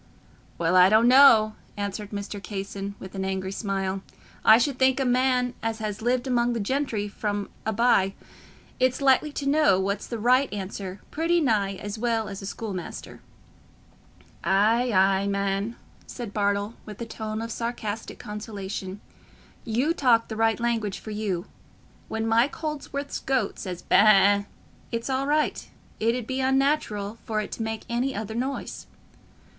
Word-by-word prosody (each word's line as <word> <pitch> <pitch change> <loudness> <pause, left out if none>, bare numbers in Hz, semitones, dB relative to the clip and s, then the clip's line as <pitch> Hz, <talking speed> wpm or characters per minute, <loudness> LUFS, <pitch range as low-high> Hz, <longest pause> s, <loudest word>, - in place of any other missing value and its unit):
"Well, 170 +2 +1
I 185 0 +8
don't 220 +3 +5
know," 245 -5 +7 0.2
answered 205 0 -4
Mr. 200 0 -5
Casson, 200 0 -5
with 190 - -9
an 190 -1 -3
angry 190 0 -2
smile. 195 -2 -2 0.4
"I 220 - +8
should 255 +2 0
think 260 0 +4
a 270 - +1
man 250 0 +2
as 225 0 -2
has 215 -1 -4
lived 245 +2 +1
among 240 -2 +1
the 230 - -2
gentry 225 -2 -1
from 205 0 -3 0.2
a - - +2
by, 205 -4 +3 0.6
is 255 0 +2
likely 275 +2 +3
to 285 - -4
know 290 -9 +4
what's 200 +1 -2
the 235 - -4
right 250 +5 +3
language 195 -1 -5
pretty 335 +3 +1
nigh 210 -9 +1
as 205 +2 -6
well 225 -2 0
as 195 - -7
a 195 - -6
schoolmaster." 200 -3 -6 1.2
"Ay, 225 +6 +3
ay, 195 0 +3
man," 200 +2 -1 0.3
said 235 -5 -7
Bartle, 205 +1 0
with 210 -2 -10
a 235 - -4
tone 220 -1 -5
of 230 +1 -4
sarcastic 225 -2 -4
consolation, 205 -3 -6 0.6
"you 250 +8 +1
talk 240 -7 +3
the 220 - -4
right 225 +1 +2
language 225 -4 -1
for 215 - -9
you. 205 -5 -2 0.6
When 220 0 -2
Mike 230 +4 +2
Holdsworth's 290 -2 -4
goat 260 -7 -1
says 180 -3 -6
ba - - +3
a - - +8
a, 205 -1 +5 0.4
it's 230 +3 -2
all 265 +1 0
right—it 290 -6 -1
'ud 250 -3 -4
be 260 +3 -3
unnatural 265 -6 0
for 215 -1 -2
it 210 - -4
to - - -5
make 220 -1 -3
any 245 +3 -1
other 220 +1 -4
noise." 260 +4 -4
220 Hz, 160 wpm, -26 LUFS, 200-250 Hz, 1.2 s, I